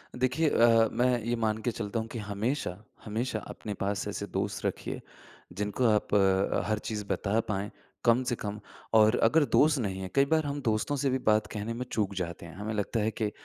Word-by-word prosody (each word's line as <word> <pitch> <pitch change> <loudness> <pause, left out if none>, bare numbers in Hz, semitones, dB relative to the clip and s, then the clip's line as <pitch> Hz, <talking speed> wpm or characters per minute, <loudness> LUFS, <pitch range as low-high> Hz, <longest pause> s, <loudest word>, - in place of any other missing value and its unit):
देखिए 130 +5 +2
अ, 115 -2 +5
मैं 125 +1 +2
ये 120 +2 0
मान 110 -2 0
के 120 - 0
चलता 110 0 -3
हूँ 110 - -4
कि 120 - -4
हमेशा, 105 0 -2 0.3
हमेशा 110 +2 -2
अपने 105 - -6
पास 100 +1 -2
ऐसे 100 0 -3
दोस्त - - -2
रखिए, - - -3 0.5
जिनको 105 +6 -1
आप 105 -1 +1 0.5
हर 110 -1 0
चीज़ 105 -2 -3
बता 105 +3 0
पाएँ, 100 0 -1 0.4
कम 120 +2 +5
से 125 -1 -1
कम 105 -1 -5 0.3
और 110 +1 +6
अगर 150 +7 +5
दोस्त 150 -1 +4
नहीं 95 -5 -2
है, 95 - -5
कई 140 0 +5
बार 155 +2 +2
हम 145 0 -3
दोस्तों 115 +4 0
से 140 0 0
भी 130 - +1
बात 110 -1 +4
कहने 105 +2 -3
में 125 +2 -4
चूक 100 -3 0
जाते 85 -2 -4
हैं। 85 - -11
हमें 105 +3 -4
लगता 105 +2 -1
है 110 +1 +1
के 105 -1 +1
110 Hz, 205 wpm, -29 LUFS, 105-125 Hz, 0.5 s, और